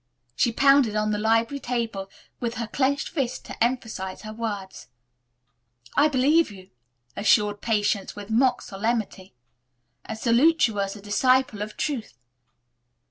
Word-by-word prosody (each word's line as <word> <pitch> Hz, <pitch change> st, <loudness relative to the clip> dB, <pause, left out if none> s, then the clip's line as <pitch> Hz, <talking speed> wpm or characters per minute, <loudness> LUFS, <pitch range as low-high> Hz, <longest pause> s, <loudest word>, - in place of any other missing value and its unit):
She 235 Hz, -, +2 dB
pounded 275 Hz, -3 st, +4 dB
on 215 Hz, 0 st, +1 dB
the 210 Hz, -, -1 dB
library 225 Hz, +5 st, +1 dB
table 230 Hz, -6 st, -3 dB, 0.3 s
with 235 Hz, -1 st, -3 dB
her 235 Hz, -, -3 dB
clenched 275 Hz, +4 st, 0 dB
fist 270 Hz, -7 st, -3 dB
to -, -, -2 dB
emphasize 225 Hz, -6 st, -3 dB
her 215 Hz, 0 st, -7 dB
words. 205 Hz, -4 st, -5 dB, 1.1 s
"I 290 Hz, -, +5 dB
believe 295 Hz, +3 st, +3 dB
you," 190 Hz, -2 st, -13 dB, 0.4 s
assured 205 Hz, 0 st, +2 dB
Patience 210 Hz, -3 st, 0 dB
with 205 Hz, +1 st, -8 dB
mock 250 Hz, +2 st, +2 dB
solemnity, 200 Hz, -, -3 dB, 0.7 s
"and 220 Hz, -, -6 dB
salute 260 Hz, +7 st, +4 dB
you 210 Hz, -3 st, -5 dB
as 195 Hz, 0 st, -2 dB
a 205 Hz, -, -11 dB
disciple 255 Hz, +2 st, +2 dB
of 215 Hz, 0 st, -6 dB
truth." 260 Hz, -, -3 dB
225 Hz, 135 wpm, -25 LUFS, 205-255 Hz, 1.1 s, I